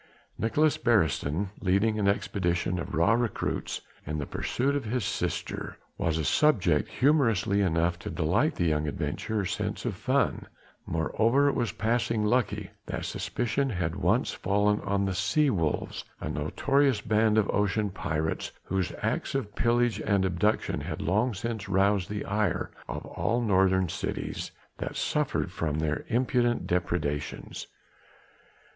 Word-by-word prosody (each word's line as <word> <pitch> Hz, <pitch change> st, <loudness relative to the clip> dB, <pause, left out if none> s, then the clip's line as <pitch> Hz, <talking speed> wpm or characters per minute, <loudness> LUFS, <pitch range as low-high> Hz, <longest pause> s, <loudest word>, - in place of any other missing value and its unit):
Nicolaes 150 Hz, +7 st, +2 dB
Beresteyn 95 Hz, -, +1 dB
leading 105 Hz, +3 st, +2 dB
an 100 Hz, -, +2 dB
expedition 90 Hz, -3 st, 0 dB
of -, -, -4 dB
raw 85 Hz, +8 st, +4 dB
recruits 120 Hz, -1 st, -1 dB, 0.2 s
in 75 Hz, +1 st, -3 dB
the 75 Hz, -, -2 dB
pursuit 135 Hz, -, -1 dB
of 140 Hz, -4 st, -2 dB
his 115 Hz, -1 st, -1 dB
sister -, -, -3 dB, 0.2 s
was 80 Hz, -1 st, 0 dB
a 80 Hz, -, -1 dB
subject 105 Hz, -, +3 dB
humorous 125 Hz, -6 st, +3 dB
enough 85 Hz, -4 st, +1 dB
to -, -, -6 dB
delight 95 Hz, -, +1 dB
the 85 Hz, -, 0 dB
young 75 Hz, -1 st, +1 dB
adventurer's 100 Hz, +6 st, -2 dB
sense -, -, -3 dB
of -, -, 0 dB
fun; -, -, 0 dB, 0.4 s
moreover 115 Hz, -, +2 dB
it -, -, 0 dB
was 120 Hz, -3 st, 0 dB
passing 115 Hz, -1 st, 0 dB
lucky 105 Hz, -3 st, 0 dB, 0.2 s
that -, -, -3 dB
suspicion 135 Hz, +3 st, -1 dB
had 90 Hz, -7 st, -1 dB
at -, -, -7 dB
once -, -, +2 dB
fallen 105 Hz, +2 st, +1 dB
on 100 Hz, 0 st, 0 dB
the 95 Hz, -, -1 dB
sea 135 Hz, +11 st, +2 dB
wolves 80 Hz, -6 st, -1 dB, 0.2 s
a -, -, -4 dB
notorious 135 Hz, -, +1 dB
band 110 Hz, +1 st, +2 dB
of 105 Hz, -2 st, +3 dB
ocean 105 Hz, 0 st, +1 dB
pirates 80 Hz, -3 st, -2 dB
whose 95 Hz, -1 st, -1 dB
acts -, -, -1 dB
of 110 Hz, -7 st, -2 dB
pillage 120 Hz, 0 st, +2 dB
and 100 Hz, -2 st, +2 dB
abduction 95 Hz, -2 st, 0 dB
had 75 Hz, +1 st, -5 dB
long 105 Hz, +9 st, +1 dB
since 110 Hz, -1 st, -4 dB
roused 100 Hz, -1 st, +2 dB
the 105 Hz, 0 st, -3 dB
ire 105 Hz, +1 st, 0 dB, 0.2 s
of -, -, -5 dB
all 120 Hz, -, -1 dB
northern 95 Hz, -4 st, +3 dB
cities -, -, -4 dB, 0.3 s
that -, -, -4 dB
suffered -, -, 0 dB
from 75 Hz, -2 st, -2 dB
their 80 Hz, -1 st, -1 dB
impudent 120 Hz, 0 st, +1 dB
depredations. 85 Hz, -5 st, -2 dB
100 Hz, 145 wpm, -28 LUFS, 90-115 Hz, 0.4 s, raw